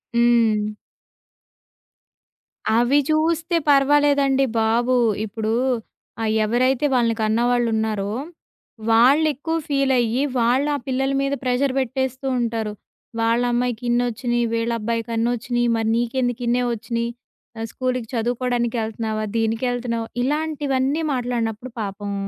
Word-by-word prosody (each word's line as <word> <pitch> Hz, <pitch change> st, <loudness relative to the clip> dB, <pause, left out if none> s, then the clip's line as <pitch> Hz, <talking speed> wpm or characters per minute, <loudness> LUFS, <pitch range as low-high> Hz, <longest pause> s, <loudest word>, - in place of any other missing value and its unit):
హ్మ్. 230 Hz, -3 st, +3 dB, 2.1 s
అవి 245 Hz, +4 st, +3 dB
చూస్తే 325 Hz, +2 st, +1 dB
పర్వాలేదండి 280 Hz, -1 st, +4 dB, 0.2 s
బాబు! 235 Hz, +3 st, +2 dB, 0.3 s
ఇప్పుడూ 220 Hz, +1 st, -3 dB, 0.7 s
ఆ -, -, -1 dB, 0.2 s
ఎవరైతే 255 Hz, +5 st, +1 dB
వాళ్ళని 235 Hz, -2 st, +2 dB
కన్నవాళ్ళున్నారో, 220 Hz, -2 st, +1 dB, 0.8 s
వాళ్ళు 260 Hz, +7 st, +5 dB
ఎక్కువ 320 Hz, +5 st, -3 dB
ఫీలయ్యి 265 Hz, -3 st, +2 dB, 0.2 s
వాళ్ల 250 Hz, +5 st, +2 dB, 0.2 s
పిల్లల 265 Hz, +1 st, 0 dB
మీద 275 Hz, 0 st, 0 dB
ప్రెషర్ 255 Hz, +1 st, +1 dB
పెట్టేస్తూ 260 Hz, +1 st, -2 dB
ఉంటారు. 225 Hz, -3 st, -2 dB, 0.5 s
వాళ్ళ 230 Hz, +1 st, +2 dB
అమ్మాయికిన్నొచ్చినాయి. 240 Hz, 0 st, 0 dB
వీళ్ళబ్బాయికిన్నొచ్చినియి. 230 Hz, +1 st, -1 dB
మరి 225 Hz, -1 st, 0 dB
నీకెందుకిన్నే 245 Hz, 0 st, 0 dB
వచ్చినియి. 235 Hz, +1 st, -3 dB, 0.6 s
స్కూలుకీ 255 Hz, -2 st, -2 dB
చదువుకోవడానికెళ్తున్నావా, 230 Hz, -2 st, -1 dB
దీనికెళ్తున్నావా, 230 Hz, +1 st, -1 dB, 0.2 s
ఇలాంటివన్నీ 290 Hz, 0 st, 0 dB
మాట్లాడినప్పుడు 240 Hz, -1 st, -2 dB
పాపం, 200 Hz, 0 st, -4 dB
240 Hz, 85 wpm, -22 LUFS, 230-260 Hz, 2.1 s, వాళ్ళు